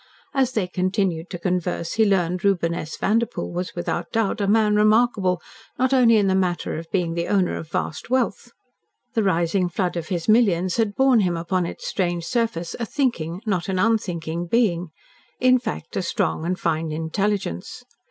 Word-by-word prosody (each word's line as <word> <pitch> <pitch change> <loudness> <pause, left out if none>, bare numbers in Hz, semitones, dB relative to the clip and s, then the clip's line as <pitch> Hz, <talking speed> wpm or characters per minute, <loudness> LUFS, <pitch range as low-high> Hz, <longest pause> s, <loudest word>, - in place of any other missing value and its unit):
As 265 -2 +1
they 215 -5 +1
continued 185 -2 -1
to 180 - -5
converse 175 -1 -2
he 220 0 +3
learned. 180 -2 +1
Reuben 175 -4 +2
S. 160 -2 -5
Vanderpoel 230 +3 0
was 180 +1 -4
without 175 - -3
doubt 225 -1 0
a 200 - +1
man 210 0 +3
remarkable 210 -3 +3 0.4
not 260 +1 +2
only 235 -4 +6
in 205 - +3
the 190 - +2
matter 185 -2 0
of 165 0 -10
being 175 -4 0
the 170 0 -2
owner 190 -3 +1
of 155 - -7
vast 160 - -3
wealth. 240 -2 0 0.6
The 225 - +2
rising 180 -1 +1
flood 180 0 -1
of 170 -2 -4
his 175 -3 -3
millions 185 -6 +3
had 220 -3 +1
borne 265 -3 +4
him 180 -4 +1
upon 175 +1 -1
its - - -8
strange 175 -3 -1
surface 225 -6 -1
a 235 - -1
thinking, 200 - -1
not 190 -4 -1
an 190 - 0
unthinking 175 -6 0
being 180 -5 +1 0.5
in 255 0 +5
fact, 245 - -6
a - - 0
strong 165 -2 -1
and 185 +1 -1
fine 160 -1 -1
intelligence. 160 - -2
185 Hz, 180 wpm, -23 LUFS, 170-220 Hz, 0.6 s, only